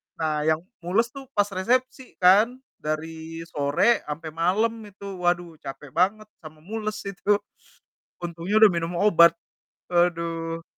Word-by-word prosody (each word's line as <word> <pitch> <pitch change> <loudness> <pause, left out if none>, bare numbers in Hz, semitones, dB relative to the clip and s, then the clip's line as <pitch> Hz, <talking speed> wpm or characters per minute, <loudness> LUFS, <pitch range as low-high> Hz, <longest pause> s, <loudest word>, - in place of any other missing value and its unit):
Nah 155 -1 -1
yang 160 +1 +2 0.2
mules 205 +8 0
tuh 270 0 -10
pas 205 - +5
resepsi 250 +7 -1
kan, 205 +7 +5 0.2
dari 160 +1 -5
sore 145 +11 +2
sampai 155 +2 -5
malam 185 +8 +1 0.2
itu. 200 -1 -9
Waduh, 175 -2 -1
capek 135 +1 -9
banget 200 +7 +1
sama 155 -1 -13
mules 215 +2 -4
itu. 200 +1 +1 0.9
Untungnya 175 +5 -1
udah 220 - +9
minum 170 -1 -2
obat. 170 -5 +6 0.5
Aduh. 165 -1 0
175 Hz, 130 wpm, -25 LUFS, 165-205 Hz, 0.9 s, udah